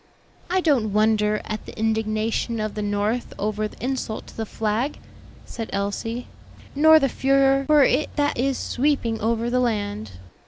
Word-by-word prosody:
"I 370 +1 +2
don't 250 - +2
wonder 210 0 +2
at 215 -1 -5
the - - -10
indignation 220 +1 -1
of 215 -1 -2
the 210 - -4
North 205 +3 -1
over 215 +1 -1
the 225 - -9
insult 255 -4 -3
to - - -14
the 225 -1 -4
flag," 220 +8 -1 0.5
said 225 -2 -6
Elsie; 205 +4 -3 0.5
"nor 315 +2 +7
the 275 -3 +3
furor 275 +1 +2
for 300 -2 +6
it 270 +3 +2
that 290 -1 +1
is 265 +2 0
sweeping 250 -5 0
over 230 +1 0
the 250 - +2
land." 205 - -2
225 Hz, 160 wpm, -23 LUFS, 215-270 Hz, 0.5 s, nor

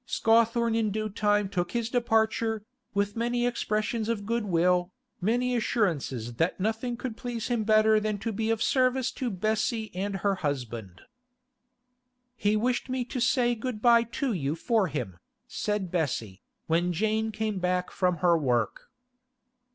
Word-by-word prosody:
Scawthorne 230 +1 +3
in 225 -1 +1
due 215 +1 -2
time 205 0 +1
took 180 -3 -2
his 235 -2 0
departure, 225 -2 +1 0.3
with 200 0 0
many 240 +1 0
expressions 220 -1 -1
of 210 -3 -2
goodwill, 180 -5 +1 0.3
many 245 +5 +1
assurances 150 - -1
that 165 +6 0
nothing 225 +4 -1
could 245 -2 -5
please 235 -1 -4
him 235 -3 +1
better 215 0 +5
than 215 -1 -1
to 225 +3 -3
be 220 +2 -2
of 225 -1 +1
service 255 -1 +2
to 255 - -3
Bessie 220 +1 -1
and 195 +2 -2
her 200 +1 +1
husband. 120 - -4 1.3
'He 210 -2 +1
wished 245 +4 0
me 255 -1 -1
to 250 - -4
say 245 -1 +3
good 235 -1 -4
bye 235 +1 +6
to 240 +2 -2
you 145 -4 -1
for 215 +3 +1
him,' 130 - -4 0.3
said 210 -4 -2
Bessie, 120 - -2 0.2
when 170 +2 +1
Jane 220 +5 0
came 215 -2 -2
back 180 0 0
from 180 -2 +1
her 170 -1 +6
work. 125 -8 0
215 Hz, 150 wpm, -28 LUFS, 180-230 Hz, 1.3 s, bye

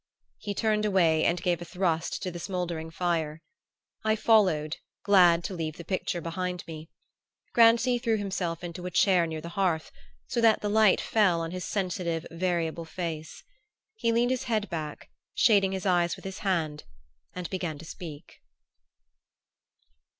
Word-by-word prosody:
He 205 -1 -4
turned 215 -1 +1
away 170 -6 +3
and 175 +1 +2
gave 175 -1 0
a - - -3
thrust 170 -2 -1
to 185 - -3
the 175 - -7
smouldering 175 -3 -3
fire. 165 -2 -2 0.6
I 220 0 +2
followed, 185 -9 +3 0.3
glad 175 -4 +5
to 190 - -4
leave 160 -3 -4
the 170 - -9
picture 185 -1 -2
behind 180 +2 -3
me. 160 0 -9 0.6
Grancy 235 +1 +5
threw 230 -2 +1
himself 180 -4 -3
into 175 +1 -6
a - - -2
chair 180 -1 +3
near 160 -1 -5
the 170 - -7
hearth, 170 -3 -1 0.3
so 235 - -1
that 225 -2 +4
the 210 - -1
light 215 -2 +5
fell 195 -6 +2
on 165 0 -4
his 180 0 -5
sensitive 180 -4 -2
variable 170 -1 -1
face. 160 -2 -6 0.5
He 235 - 0
leaned 240 +2 +2
his 255 - -1
head 215 -3 -1
back, 155 -3 -5 0.2
shading 200 -5 +4
his 190 +1 -4
eyes 175 -2 +2
with - - -15
his 190 +1 -6
hand, 160 -7 -1 0.5
and 180 -1 -4
began 175 -5 -3
to 160 - -11
speak. 160 -2 -10
180 Hz, 160 wpm, -28 LUFS, 165-200 Hz, 0.6 s, glad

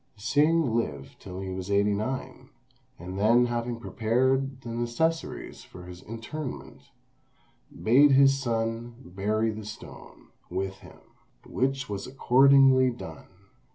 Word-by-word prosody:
Hsing 145 +5 +2
lived 70 -12 -4
till 95 0 -8
he 95 -1 -5
was 95 +1 -6
eighty 100 +1 +2
nine; 110 +6 -5 0.5
and 90 +3 -7
then 115 +4 +4
having 120 0 -3
prepared 130 +4 0
the 120 - -8
necessaries 120 +8 -2
for 90 - -13
his 90 0 -11
interment, 115 +6 -7 1.0
bade 135 +5 +6
his 135 0 +6
son 115 -1 -3
bury 105 +5 -1
the 110 0 -7
stone 105 +1 -12 0.2
with 95 0 -3
him, - - -16 0.4
which 135 +1 -1
was 100 -1 -5
accordingly 135 0 +5
done. 80 -10 -9
115 Hz, 120 wpm, -27 LUFS, 100-135 Hz, 1.0 s, bade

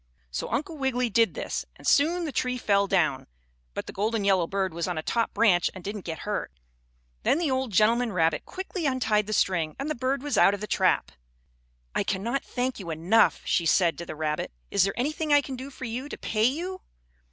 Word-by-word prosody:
So 65 - -3
Uncle 310 +2 -3
Wiggily 250 -3 0
did 230 +1 +3
this, - - -3
and - - -15
soon 335 +5 +3
the 305 - -3
tree 250 -1 -1
fell 200 -4 +2
down, 155 -8 +1 0.5
but - - -3
the - - -8
golden 215 +2 0
yellow 190 -4 +3
bird 190 -2 -1
was 170 +1 -2
on 180 -2 -2
a 155 - -3
top 230 +5 0
branch 200 -5 +3
and 185 - -9
didn't 205 0 -5
get 160 -2 -5
hurt. 210 - -2 0.7
Then - - +2
the 330 -5 0
old 260 -2 -1
gentleman 225 +4 +3
rabbit 165 -4 +1
quickly 370 -3 -4
untied 220 -6 +1
the - - -4
string 170 -7 +1
and 285 +3 -3
the - - +1
bird 265 +1 -1
was 290 -2 0
out 200 - +6
of - - -9
the 210 - -4
trap. - - +1 0.8
"I - - +1
cannot 235 +8 -1
thank 250 -1 -2
you 180 -4 -7
enough!" 170 +8 +3
she 170 - +1
said 170 0 +3
to 170 - -5
the - - -6
rabbit. 150 - -2 0.2
"Is 195 -2 +4
there 195 +4 -3
anything 305 +4 -1
I 290 0 +6
can 270 -1 -6
do 260 +2 -7
for 260 -1 -8
you 250 +5 -4
to - - -6
pay 215 0 0
you?" 350 +9 -1
225 Hz, 220 wpm, -27 LUFS, 190-265 Hz, 0.8 s, out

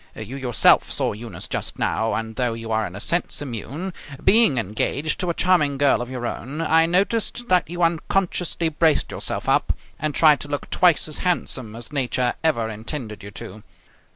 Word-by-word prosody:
You 110 +4 -7
yourself 130 -4 +3
saw - - 0
Eunice 105 -4 -7
just - - -4
now: 110 0 0
and, 110 0 -4
though 125 -3 0
you 115 0 -6
are 110 -1 +1
in 90 - -10
a - - -6
sense 170 +10 0
immune, 145 - -5 0.3
being 205 - +5
engaged 115 +8 -1
to 180 - -1
a 170 - -1
charming 155 -6 +2
girl 140 -2 +3
of 120 - -5
your 125 -2 -5
own, 135 +5 -5
I 165 0 +3
noticed 215 +6 0
that 180 -2 +3
you 175 0 -2
unconsciously 170 0 0
braced 155 -1 +1
yourself - - -3
up - - +2 0.3
and 150 -2 -2
tried 150 -3 +5
to - - -7
look 145 0 -5
twice 175 -4 +3
as 155 - -5
handsome 130 - -1
as 120 +4 -7
nature 125 -2 0
ever 135 -9 +1
intended 110 +1 -6
you 100 - -9
to. 105 +1 -10
140 Hz, 185 wpm, -22 LUFS, 115-170 Hz, 0.3 s, being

